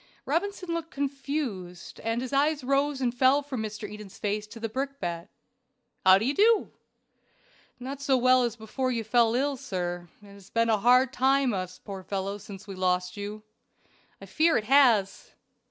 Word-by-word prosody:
Robinson 385 0 -2
looked 330 -1 -4
confused, 275 - -4
and 225 +2 -2
his 260 - -6
eyes 290 +1 +2
rose 275 +1 +1
and 245 -2 0
fell 265 +3 +3
from 265 -5 -4
Mr. 215 -1 -5
Eden's 210 -1 -10
face 210 0 -2
to 230 - -11
the 225 - -2
brickbat. 220 -9 -4 0.7
"How 190 0 +8
do 210 - -1
you 270 - +1
do?" 435 +5 +3 1.1
"Not 270 +3 -6
so 275 -2 +2
well 255 +1 +4
as 235 -2 -1
before 245 +4 -3
you 230 -2 -2
fell 230 +1 +3
ill, 275 +2 0
sir. 175 -5 -4
It 200 -1 -14
has 200 -1 -16
been 230 0 +1
hard 245 +4 +4
times 270 0 +2
with 195 - -1
us 185 0 -7
poor 195 -2 -6
fellows 195 +1 -4
since 200 -2 -10
we 200 - -8
lost 180 0 0
you." 205 +1 -6 0.8
"I - - -10
fear 320 +1 +2
it 220 - -1
has." 240 -7 +3
235 Hz, 175 wpm, -27 LUFS, 200-275 Hz, 1.1 s, How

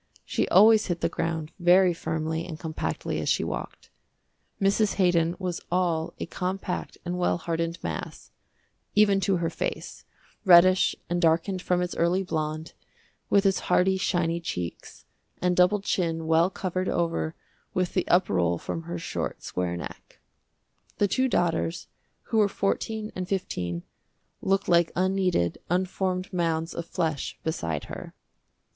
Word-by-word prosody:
She - - 0
always 215 +2 +6
hit 175 -2 -2
the - - +1
ground 160 -1 -3
very 180 +1 +5
firmly 160 0 -2
and 160 -3 -7
compactly 160 -2 -3
as - - -1
she - - +2
walked. - - -6 0.7
Mrs. 200 +1 +2
Haydon 175 -3 +2
was 180 -3 -3
all 170 -3 0
a - - -2
compact 185 0 -4
and 180 +1 -2
well 175 - +2
hardened 165 0 -2
mass, - - -5 0.6
even 200 -2 +5
to 195 0 +1
her 170 -1 -1
face, - - -4 0.4
reddish 185 0 +6
and 175 0 -1
darkened 170 +3 +2
from 180 0 +1
its 180 - -4
early 175 +3 +2
blonde, 155 -2 -3 0.6
with 200 0 +4
its 195 -1 +3
hearty, 190 +1 +4
shiny 175 -3 0
cheeks, 90 - -6 0.3
and 180 0 +1
doubled 185 +3 +4
chin 165 -5 -1
well 165 +2 +4
covered 185 -1 -2
over 165 -2 -1 0.4
with 185 -1 0
the 185 - 0
up 180 +2 +4
roll 85 -1 +1
from 165 - -4
her 170 +1 -4
short, 170 - -4
square 90 -1 -2
neck. - - -9 0.8
The 205 - +3
two 260 +6 +1
daughters, 170 -5 0 0.4
who 225 - 0
were 205 -1 +4
fourteen 215 +2 -2
and 185 -1 -3
fifteen, 90 - -2 0.6
looked 195 +1 +1
like 170 -1 +4
unkneaded, 185 - +1
unformed 185 +1 -1
mounds 165 -2 0
of 170 0 -5
flesh 155 -4 -2
beside 85 - -2
her. - - -8
175 Hz, 145 wpm, -26 LUFS, 165-190 Hz, 0.8 s, always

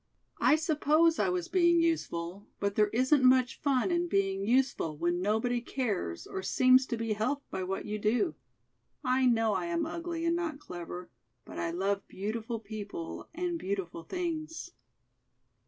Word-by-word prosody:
I - - +5
suppose 315 +1 +3
I 195 - +2
was 180 -1 -1
being 345 -1 +4
useful, 200 - -1
but 200 0 0
there 210 0 +3
isn't 260 +6 +3
much 255 -1 +4
fun 280 +4 +2
in 345 0 +1
being 195 - 0
useful 240 - +1
when 175 +2 0
nobody 225 +5 +1
cares 210 - -3
or 190 - -5
seems 255 +6 +4
to 235 - -2
be 225 -1 -1
helped 255 +7 -2
by 190 - -3
what 190 +1 -3
you 210 0 -3
do. 245 - +1 0.7
I 255 0 +3
know 225 -3 +3
I - - -1
am 335 -1 0
ugly 335 0 -4
and 335 0 +2
not 335 -4 -2
clever, 175 - -8 0.3
but - - -8
I 170 - -1
love 195 +3 -1
beautiful 220 +3 -4
people 205 -5 -7
and, 350 0 -2
beautiful 190 - -3
things." 330 - -4
240 Hz, 160 wpm, -30 LUFS, 195-315 Hz, 0.7 s, I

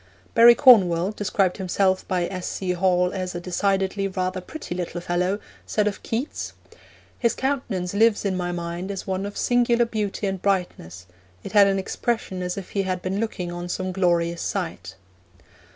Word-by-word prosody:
Barry 235 0 +8
Cornwall, 190 -8 +6
described 195 -3 0
himself 190 0 0
by 180 -2 0
S. 185 0 -5
C. 185 -2 -2
Hall 180 0 +2
as 185 -2 -4
'a - - -2
decidedly 195 +2 0
rather 185 -1 -2
pretty 315 - -7
little 175 -1 -4
fellow,' 180 +3 0 0.3
said 210 - +1
of 210 -1 -2
Keats: 240 +7 -4 0.7
'His 235 -2 +1
countenance 240 -10 -2
lives 215 0 +3
in 195 -2 0
my 175 -1 -2
mind 175 +2 -4
as 195 -2 -5
one 190 +1 -2
of 205 - -8
singular 240 -1 +3
beauty 210 -3 -3
and 190 -2 -2
brightness, 175 - -2 0.4
it - - -7
had 205 -2 +6
an 195 0 +1
expression 190 -1 -2
as 180 +1 -3
if 195 - -7
he 200 - 0
had 185 -2 -3
been 190 +2 -2
looking 185 -6 -3
on 175 0 -6
some 185 +1 -2
glorious 170 -2 +1
sight.' 160 - -4
190 Hz, 170 wpm, -24 LUFS, 180-205 Hz, 0.7 s, Barry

